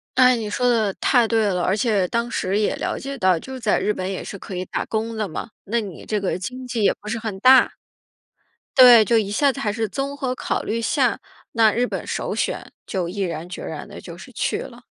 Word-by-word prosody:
诶， 255 -1 +5
你 215 -2 -4
说 245 +3 +1
得 215 -5 +2
太 240 -3 +3
对 225 -1 +2
了， 185 -3 0
而 190 - +2
且 205 -4 +1
当 235 +3 -2
时 195 +2 -1
也 210 - +1
了 - - -2
解 275 0 -6
到， 185 -5 +3
就 260 +8 -8
在 220 -3 +2
日 210 - +1
本 185 0 -4
也 190 - -4
是 200 - -7
可 190 - -8
以 180 - -2
打 - - -4
工 220 0 -3
的 215 -2 -1
嘛， 185 - -6 0.2
那 230 +3 0
你 195 -5 -9
这 210 -2 -1
个 185 - -1
经 255 +7 -6
济 240 -3 -3
也 - - +4
不 210 - -8
是 230 +1 -2
很 215 -4 -5
大。 260 +1 +6 1.0
对， 240 -4 +9
就 230 +2 +3
一 205 -2 0
下 275 +5 +2
子 275 - -7
还 210 - 0
是 220 0 -2
综 275 +5 -4
合 255 -2 -2
考 - - -2
虑 230 +1 -2
下， 250 +1 +1 0.3
那 225 -2 +5
日 245 +3 0
本 - - -5
首 - - -3
选 - - -3
就 185 -3 -2
毅 195 +3 -6
然 170 -2 -3
决 - - -7
然 - - -6
地 - - -10
就 - - -10
是 - - -13
去 - - -1
了。 - - -10
220 Hz, 260 characters per minute, -22 LUFS, 200-245 Hz, 1.0 s, 对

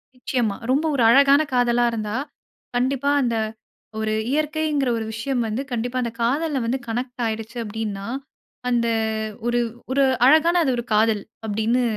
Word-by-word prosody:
நிச்சயமா. 240 -4 -1 0.2
ரொம்ப 295 +4 +2
ஒரு 250 -4 +2
அழகான 280 +3 +6
காதலா 245 -1 +3
இருந்தா, 215 -1 -3 0.6
கண்டிப்பா 265 +3 +1
அந்த 235 -2 0 0.6
ஒரு 215 0 -1 0.2
இயற்கைங்கிற 300 -2 0
ஒரு 220 - -3
விஷயம் 240 +2 -1
வந்து, 220 +5 -2
கண்டிப்பா 245 +2 -2
அந்த 235 -1 -2
காதல 280 +3 +1
வந்து 255 +3 -1
கனெக்ட் 245 +2 -4
ஆயிடுச்சு 225 +1 -4
அப்டீன்னா, 210 -2 -4 0.6
அந்த 235 -1 +2 0.6
ஒரு 240 0 +2 0.3
ஒரு 275 0 +3 0.2
அழகான 330 +4 +5
ஒரு 240 - -3
காதல் 215 -1 +3 0.2
அப்டீனு 220 +4 +1
245 Hz, 135 wpm, -23 LUFS, 225-275 Hz, 0.6 s, அழகான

